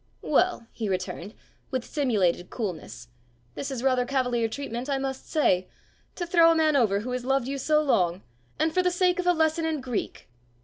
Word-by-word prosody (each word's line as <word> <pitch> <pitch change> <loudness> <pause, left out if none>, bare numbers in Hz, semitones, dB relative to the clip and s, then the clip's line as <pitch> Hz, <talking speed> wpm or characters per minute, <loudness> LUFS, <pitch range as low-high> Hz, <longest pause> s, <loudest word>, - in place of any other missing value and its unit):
"Well," 360 -10 +2
he 220 -3 -4
returned, 185 +3 -4 0.3
with 260 -3 -2
simulated 205 - 0
coolness, 180 - -6 0.4
"this 280 - -5
is 260 -3 -4
rather 255 -2 +3
cavalier 245 -3 0
treatment, 255 +1 -5
I 275 - +1
must 265 -1 -4
say! 185 - +2 0.5
To 350 - -3
throw 335 -1 +5
a - - +3
man 310 -2 +3
over 210 -6 +3
who 250 +3 -5
has 250 0 -3
loved 270 -1 +1
you 275 0 -3
so 305 +3 +2
long 180 - +1 0.3
and 315 0 +1
for 370 - +3
the 360 - +2
sake 360 0 +1
of 360 - -1
a - - +7
lesson 320 0 +1
in 320 -2 -1
Greek!" 250 -4 -4
265 Hz, 190 wpm, -26 LUFS, 230-315 Hz, 0.5 s, a